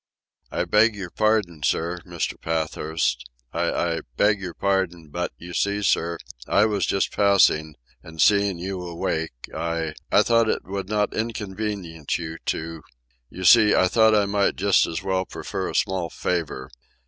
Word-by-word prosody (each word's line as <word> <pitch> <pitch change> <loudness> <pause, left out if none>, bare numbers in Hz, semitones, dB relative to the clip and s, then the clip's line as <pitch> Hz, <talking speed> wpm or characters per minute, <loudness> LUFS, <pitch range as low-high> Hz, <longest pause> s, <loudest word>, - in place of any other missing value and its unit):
"I - - -1
beg 110 +1 +4
your 95 -4 -7
pardon, 105 -7 +1
sir, 85 +5 0
Mr. - - -2
Pathurst... 80 -3 -1 0.3
I—I 85 -1 0 0.2
beg 105 -1 +3
your 90 -3 -6
pardon; 90 -5 -1
but, 90 +4 -3
you 90 +1 -10
see, 100 +2 0
sir, 85 -3 +1 0.3
I 100 - +4
was 105 -2 0
just 95 - 0
passing, 85 -7 +3 0.3
and 80 0 -13
seeing 100 -2 +4
you 95 +1 -4
awake 85 -2 -2 0.3
I... 85 -2 -2 0.2
I - - +5
thought 115 -1 +3
it - - -1
would 95 0 -5
not 105 -1 0
inconvenience 100 -7 -3
you 80 -1 -6
to... 80 0 -3 0.5
you 95 - -8
see, 105 +2 +7
I 95 - +4
thought 110 +2 +4
I 105 -1 +3
might 100 0 +1
just 100 0 +3
as 85 +3 -4
well 95 -1 0
prefer - - -5
a - - -6
small 95 -3 0
favour 75 -7 -3
95 Hz, 160 wpm, -24 LUFS, 85-100 Hz, 0.5 s, see